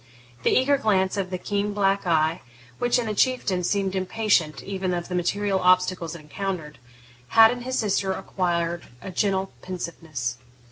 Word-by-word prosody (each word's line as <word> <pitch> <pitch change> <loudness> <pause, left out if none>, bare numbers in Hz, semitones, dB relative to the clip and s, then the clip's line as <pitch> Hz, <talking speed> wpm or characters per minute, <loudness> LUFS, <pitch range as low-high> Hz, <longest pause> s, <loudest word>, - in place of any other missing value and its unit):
The - - +2
eager 275 +2 +3
glance 190 -6 +2
of 195 -2 -2
the 185 - -3
keen 205 +2 -2
black 195 -1 +1
eye, 160 0 +2 0.4
which, 245 - +2
in 245 - -1
the 215 - -2
Chieftain, 205 -5 +1
seemed 195 +1 0
impatient 185 -4 +1
even 190 -2 -2
of 175 +1 -4
the - - -4
material 195 +2 0
obstacles 180 -2 +2
it 170 - -9
encountered, 160 -1 -5 0.5
had 225 0 +7
in 245 0 -4
his 255 +1 -2
sister 195 -3 +1
acquired 175 -3 -2 0.2
a 190 - -6
gentle 190 +1 0
pensiveness. 160 -9 -5
190 Hz, 160 wpm, -25 LUFS, 175-205 Hz, 0.5 s, had